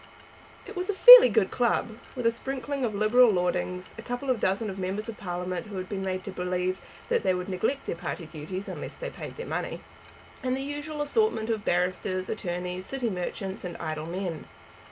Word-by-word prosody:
It 420 - -9
was 360 +2 -3
a 410 - 0
fairly - - +11
good - - +2
club, - - +1 0.3
with 250 -2 -4
a 230 - +5
sprinkling 270 +3 -4
of 220 -4 -1
Liberal 225 +4 +5
lordlings, 180 0 -1
a - - -5
couple 245 +3 -2
of 245 - 0
dozen 195 +3 0
of 195 -1 -5
members 190 +4 -3
of 230 - -5
Parliament 180 +1 -4
who 205 - -8
had 185 0 -4
been 195 -1 -4
made 185 0 -2
to 195 - -6
believe 180 0 -2 0.3
that 475 -1 +2
they 185 - +2
would 180 0 -4
neglect 220 +9 -1
their - - -2
party 170 0 -5
duties 160 +5 -6
unless - - -6
they - - -6
paid - - -8
their 475 - -5
money, - - -4 0.6
and 255 -1 0
the 270 - -3
usual 295 +1 -4
assortment 290 - +1
of 215 -2 -2
barristers, 185 +1 0
attorneys, 180 -2 -4
city 255 -4 -2
merchants 190 +1 -4
and 180 -2 -5
idle 155 -1 -4
men. 175 -2 -4
195 Hz, 200 wpm, -27 LUFS, 180-255 Hz, 0.6 s, fairly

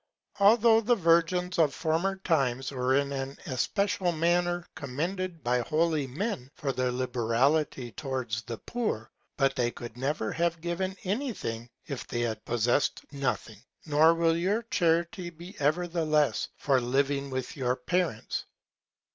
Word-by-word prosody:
Although 225 +2 +6
the 240 +2 +3
Virgins 175 0 +2
of 150 -4 +3
former 165 +4 0
Times 135 -9 0
were 130 0 +1
in 140 0 +1
an 135 0 -4
especial 180 +6 0
Manner 175 +1 +1
commended 165 +5 -3
by 125 +1 +2
holy 155 +2 +1
Men, 135 - -3
for 140 -2 -2
their 130 0 0
Liberality 125 +2 +1
towards 130 -5 -3
the 115 0 -6
Poor; 215 - -3 0.3
but 135 0 +2
they 120 -2 +1
could 120 -1 -9
never 135 -4 -1
have 170 0 0
given 180 +3 -2
any 235 +7 -1
Thing, 115 - -5 0.2
if 140 -5 -6
they 120 - -2
had 110 -2 -2
possessed 120 +4 +1
nothing. 130 -6 -3 0.2
Nor 155 +2 +5
will 165 -1 +3
your 195 +7 0
Charity 170 -1 +1
be 175 +4 -11
ever 155 +5 +2
the 170 -1 -1
less 150 -2 +2
for 135 -3 +2
living 140 +3 0
with 130 -1 -4
your 125 -3 0
Parents. 160 -2 -1
150 Hz, 145 wpm, -29 LUFS, 130-175 Hz, 0.3 s, Although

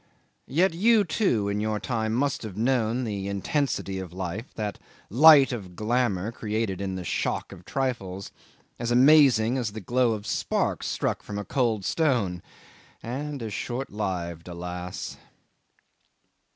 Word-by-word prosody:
Yet 170 +6 +2
you, 215 +5 +4
too, 155 - +1
in 100 0 -1
your 110 0 -1
time 110 -2 -1
must 140 +2 0
have 105 -4 -7
known 120 0 +1
the 100 -4 -3
intensity 100 - -1
of 95 -3 -7
life, 95 +6 -5
that 105 -2 -4 0.3
light 145 +3 +8
of 95 -7 -6
glamour 110 -2 0
created 110 -4 -2
in 95 -1 -3
the 90 - -5
shock - - -2
of 90 - -12
trifles, 100 -8 -3 0.5
as 120 0 -2
amazing 130 -2 +5
as 110 -4 -2
the 110 - -5
glow 120 +3 +1
of 105 -1 -6
sparks - - -1
struck - - -1
from 100 - -6
a 105 - -4
cold 115 -4 0
stone 115 - +1 0.6
and 140 +2 -4
as 110 -2 -5
short 125 +6 -4
lived, 90 -5 -3
alas! 90 +1 -6
110 Hz, 145 wpm, -26 LUFS, 95-130 Hz, 0.6 s, light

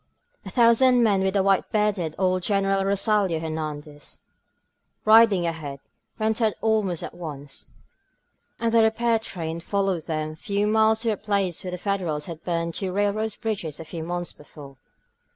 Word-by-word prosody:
A - - -8
thousand 245 +1 +5
men, 200 -4 +3
with 190 +1 +1
white 195 -1 +2
bearded 205 -7 0
old 185 -1 +1
Greneral 195 0 +1
Rosalio 200 -3 +1
Hernandez 155 -2 -6 0.8
riding 215 -4 +6
ahead, 155 -4 -4 0.4
went 220 +2 0
out 220 -2 +3
almost 215 -6 0
at - - -6
once, 145 -5 -8 0.9
and 230 -1 0
the 230 0 +5
repair 225 +1 +2
train 170 -6 -5
followed 195 -1 -1
them 155 -1 -2
a - - -10
few 200 +5 -1
miles 220 +1 +3
to 230 -1 +1
a 210 - -2
place 200 -4 -1
where 185 - -4
the 180 - -4
Federals 175 -6 -2
had 165 -2 -8
burned 170 -1 -2
two 190 +1 -3
railroad 205 +2 0
bridges 195 -9 -3
a 165 - -7
few 160 0 -6
months 175 +1 -3
before. 145 -2 -13
195 Hz, 160 wpm, -24 LUFS, 165-215 Hz, 0.9 s, riding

